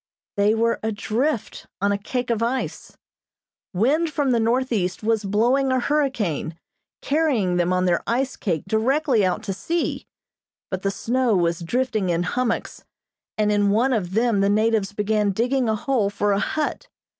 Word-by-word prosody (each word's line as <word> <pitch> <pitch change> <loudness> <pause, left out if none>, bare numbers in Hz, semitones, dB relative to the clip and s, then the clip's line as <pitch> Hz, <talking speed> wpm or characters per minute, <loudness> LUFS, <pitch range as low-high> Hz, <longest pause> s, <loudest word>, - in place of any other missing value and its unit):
They 205 +2 +3
were 230 +1 +1
adrift 220 +4 -2
on 200 +1 +1
a 200 - +1
cake 245 +4 -3
of 230 -1 0
ice. 245 +3 -3 0.7
Wind 290 - +1
from 285 -4 0
the 235 - +2
northeast 225 -5 0
was 220 -1 +1
blowing 240 +7 +2
a 260 - +2
hurricane, 240 - -1 0.5
carrying 270 - +1
them 175 0 +1
on 185 0 +1
their 175 -1 +2
ice 260 +3 0
cake 170 -7 -2
directly 245 +3 +2
out 185 -1 0
to 195 - -3
sea; 330 - -2 0.6
but 185 -1 -2
the 195 - 0
snow 240 +2 0
was 170 -2 +1
drifting 220 +2 -1
in 170 0 +1
hummocks, 235 +6 -2 0.5
and 210 -1 +2
in 205 -1 +2
one 240 +6 +2
of 190 -5 -2
them 230 -2 +2
the 200 0 +2
natives 215 -1 +1
began 210 0 0
digging 245 +3 +1
a 220 - +2
hole 220 -2 0
for 205 0 0
a 200 - +2
hut. 310 - -2
220 Hz, 165 wpm, -23 LUFS, 200-255 Hz, 0.7 s, They